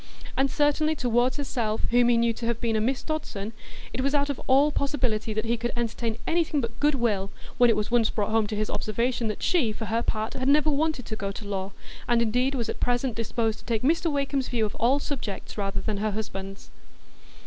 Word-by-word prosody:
And 270 Hz, +1 st, +2 dB
certainly 300 Hz, +2 st, +2 dB
toward 245 Hz, -1 st, +2 dB
herself, 235 Hz, -6 st, -2 dB
whom 240 Hz, 0 st, +5 dB
he 240 Hz, -, +4 dB
knew 235 Hz, 0 st, +3 dB
to 230 Hz, +1 st, -4 dB
have 235 Hz, -1 st, 0 dB
been 230 Hz, -2 st, 0 dB
a 215 Hz, -, +2 dB
Miss 255 Hz, +4 st, 0 dB
Dodson, 230 Hz, -9 st, -4 dB, 0.4 s
it 260 Hz, -, -1 dB
was 275 Hz, +2 st, +1 dB
out 285 Hz, 0 st, +2 dB
of 275 Hz, -, -6 dB
all 275 Hz, +3 st, +5 dB
possibility 250 Hz, -7 st, -1 dB
that 215 Hz, +1 st, -1 dB
he 235 Hz, +1 st, +1 dB
could 240 Hz, +1 st, -2 dB
entertain 230 Hz, -1 st, -2 dB
anything 330 Hz, -3 st, +1 dB
but 230 Hz, -2 st, -4 dB
good 295 Hz, 0 st, +3 dB
will, 210 Hz, -6 st, 0 dB, 0.3 s
when 245 Hz, -1 st, +7 dB
it -, -, +4 dB
was 210 Hz, +2 st, -2 dB
once 235 Hz, -2 st, +4 dB
brought 210 Hz, -1 st, -1 dB
home 220 Hz, -1 st, +2 dB
to 215 Hz, -, -3 dB
his 215 Hz, 0 st, -1 dB
observation 235 Hz, +2 st, -1 dB
that 215 Hz, -, -4 dB
she, 300 Hz, -, +2 dB
for 220 Hz, +1 st, -5 dB
her 225 Hz, +2 st, 0 dB
part, 220 Hz, -1 st, -2 dB
had 260 Hz, 0 st, -2 dB
never 300 Hz, +2 st, +4 dB
wanted 295 Hz, -3 st, 0 dB
to 220 Hz, -, -4 dB
go 200 Hz, -2 st, -3 dB
to 210 Hz, -, -8 dB
law, 195 Hz, -1 st, -3 dB, 0.4 s
and 240 Hz, -1 st, +3 dB
indeed 250 Hz, +4 st, +1 dB
was 235 Hz, -3 st, -1 dB
at -, -, -4 dB
present 245 Hz, 0 st, +1 dB
disposed 225 Hz, 0 st, -1 dB
to -, -, -18 dB
take 230 Hz, -2 st, -1 dB
Mr 330 Hz, +3 st, +2 dB
Wakem's 280 Hz, -2 st, 0 dB
view 230 Hz, -3 st, +1 dB
of 210 Hz, -, -4 dB
all 250 Hz, +4 st, +4 dB
subjects 265 Hz, -8 st, -5 dB
rather 195 Hz, -2 st, -2 dB
than 215 Hz, -2 st, -2 dB
her 215 Hz, +2 st, 0 dB
husband's. 195 Hz, -2 st, -6 dB
235 Hz, 225 wpm, -26 LUFS, 220-275 Hz, 0.4 s, when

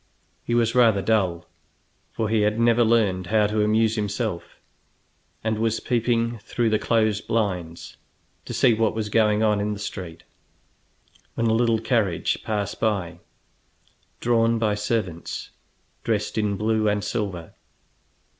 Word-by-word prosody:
He 120 Hz, -, -1 dB
was 115 Hz, -1 st, +2 dB
rather 115 Hz, -6 st, +4 dB
dull, 95 Hz, -5 st, 0 dB, 0.7 s
for 110 Hz, -, -2 dB
he 110 Hz, 0 st, +1 dB
had 105 Hz, +2 st, +1 dB
never 120 Hz, 0 st, +4 dB
learned 105 Hz, -6 st, +1 dB
how 105 Hz, +1 st, +3 dB
to 105 Hz, +1 st, 0 dB
amuse 110 Hz, +1 st, +2 dB
himself, 105 Hz, -1 st, -3 dB, 0.8 s
and 110 Hz, -1 st, -1 dB
was 115 Hz, 0 st, 0 dB
peeping 115 Hz, -1 st, 0 dB
through 115 Hz, +1 st, -1 dB
the 110 Hz, -, +2 dB
closed 110 Hz, -3 st, 0 dB
blinds 90 Hz, -7 st, -3 dB, 0.5 s
to -, -, -6 dB
see 125 Hz, -3 st, +4 dB
what 110 Hz, -1 st, 0 dB
was 110 Hz, -1 st, -3 dB
going 105 Hz, 0 st, +2 dB
on 105 Hz, -2 st, +2 dB
in 105 Hz, +1 st, -1 dB
the 100 Hz, -, -7 dB
street, 90 Hz, -5 st, -7 dB, 1.1 s
when 115 Hz, -, 0 dB
a 110 Hz, -, +3 dB
little 115 Hz, 0 st, +2 dB
carriage 110 Hz, -7 st, 0 dB
passed 105 Hz, -2 st, -3 dB
by, 95 Hz, -6 st, -1 dB, 1.0 s
drawn 115 Hz, -1 st, +2 dB
by 110 Hz, -2 st, +1 dB
servants 105 Hz, -5 st, -3 dB, 0.5 s
dressed 105 Hz, -2 st, -1 dB
in 105 Hz, -3 st, 0 dB
blue 110 Hz, 0 st, +1 dB
and 105 Hz, 0 st, -1 dB
silver. 100 Hz, -6 st, -4 dB
110 Hz, 140 wpm, -24 LUFS, 105-115 Hz, 1.1 s, rather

